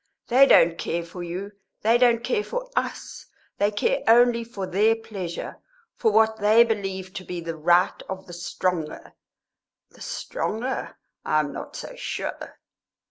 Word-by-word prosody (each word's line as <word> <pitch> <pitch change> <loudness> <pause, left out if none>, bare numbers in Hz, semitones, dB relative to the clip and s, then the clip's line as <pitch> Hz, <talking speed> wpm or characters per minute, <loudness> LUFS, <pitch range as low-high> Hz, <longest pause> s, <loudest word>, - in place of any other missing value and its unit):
They 265 +3 +7
don't 165 -8 +5
care 170 0 -2
for 175 +2 -9
you; 180 +4 -5 0.3
they 230 +3 +4
don't 235 -2 +4
care 425 - 0
for - - -5
us. - - -4 0.3
They 205 - +3
care 205 0 0
only 235 0 +5
for 220 -4 -6
their 210 +5 +3
pleasure, 195 -6 -6 0.4
for 445 - +2
what 220 - +3
they 215 +2 +6
believe 195 -4 -3
to 190 - -6
be 180 0 -5
the 165 -1 -5
right 175 +3 +2
of 190 0 -6
the 175 - -11
stronger. 175 -2 -3 0.8
The - - -19
stronger? 265 - -4 0.3
I 155 - +2
am 145 -2 -5
not - - -8
so - - -7
sure!" - - -5
205 Hz, 155 wpm, -24 LUFS, 175-230 Hz, 0.8 s, They